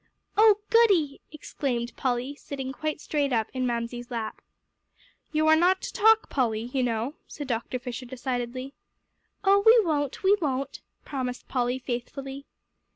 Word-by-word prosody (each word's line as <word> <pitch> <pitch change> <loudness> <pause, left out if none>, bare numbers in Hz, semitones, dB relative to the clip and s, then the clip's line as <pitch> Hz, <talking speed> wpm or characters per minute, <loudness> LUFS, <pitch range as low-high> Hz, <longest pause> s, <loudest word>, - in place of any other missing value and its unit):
"Oh, 430 0 +7 0.2
goody!" 390 -12 +4
exclaimed 250 -5 -3
Polly, 255 +1 -1
sitting 270 -2 -6
quite 310 +1 -3
straight 290 -2 -1 0.2
in 255 -1 0
Mamsie's 240 0 -3
lap. 230 -3 -4 0.9
"You 310 0 +2
are 315 0 +7
not 360 +4 +4
to - - -5
talk, 445 0 +5
Polly, 235 -3 -1
you 265 - +1
know," 240 +2 -1
said 290 - -7
Dr. 245 0 -2
Fisher 250 0 -6
decidedly. 255 +1 -4 0.7
"Oh, 400 0 +5
we 455 +2 +8
won't 290 -2 -1
we 390 +2 +6
won't," 275 -3 -2 0.2
promised 255 -3 -4
Polly 250 -1 0
faithfully. 270 +2 -5
270 Hz, 140 wpm, -27 LUFS, 245-310 Hz, 0.9 s, we